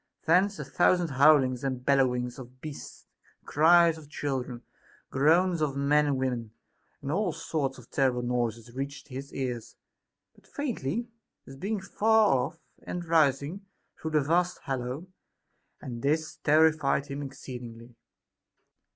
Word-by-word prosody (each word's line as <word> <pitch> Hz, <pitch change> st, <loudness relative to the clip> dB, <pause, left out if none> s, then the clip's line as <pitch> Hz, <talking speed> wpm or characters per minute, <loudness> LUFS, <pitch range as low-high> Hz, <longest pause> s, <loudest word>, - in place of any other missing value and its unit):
Thence 190 Hz, +5 st, +3 dB
a -, -, -5 dB
thousand 175 Hz, -2 st, +2 dB
howlings 135 Hz, -2 st, +4 dB
and 130 Hz, -2 st, -3 dB
bellowings 125 Hz, -3 st, +1 dB
of 130 Hz, 0 st, -12 dB
beasts, 150 Hz, 0 st, -9 dB, 0.4 s
cries 165 Hz, +1 st, +5 dB
of 150 Hz, -2 st, -15 dB
chil 140 Hz, -3 st, -2 dB
dren, 125 Hz, -1 st, -8 dB, 0.5 s
groans 165 Hz, +5 st, +3 dB
of 140 Hz, -3 st, 0 dB
men 145 Hz, +2 st, +3 dB
and 140 Hz, -2 st, +1 dB
women, 120 Hz, -4 st, -2 dB, 0.5 s
and 140 Hz, -, -3 dB
all 190 Hz, +2 st, +1 dB
sorts 140 Hz, -4 st, -3 dB
of 125 Hz, -2 st, -15 dB
terrible 130 Hz, -3 st, +1 dB
noises 120 Hz, -1 st, -2 dB
reached 140 Hz, +2 st, -6 dB
his 135 Hz, +2 st, -7 dB
ears; 125 Hz, -4 st, -4 dB, 0.6 s
but -, -, -24 dB
faintly, 235 Hz, -, -3 dB, 0.4 s
as 135 Hz, -, -11 dB
being 200 Hz, +9 st, -2 dB
far 215 Hz, -1 st, +3 dB
off 160 Hz, +3 st, -9 dB, 0.2 s
and 175 Hz, -1 st, -5 dB
rising 155 Hz, +2 st, +2 dB, 0.4 s
through 160 Hz, -, -3 dB
the 155 Hz, -1 st, +2 dB
vast 175 Hz, +5 st, +1 dB
hollow; 130 Hz, +4 st, -3 dB, 0.8 s
and 120 Hz, -2 st, -6 dB
this 155 Hz, +2 st, 0 dB
terrified 155 Hz, -2 st, +3 dB
him 140 Hz, 0 st, -6 dB
ex 140 Hz, -1 st, -8 dB
ceedingly. 120 Hz, -2 st, -9 dB
140 Hz, 140 wpm, -28 LUFS, 130-160 Hz, 0.8 s, cries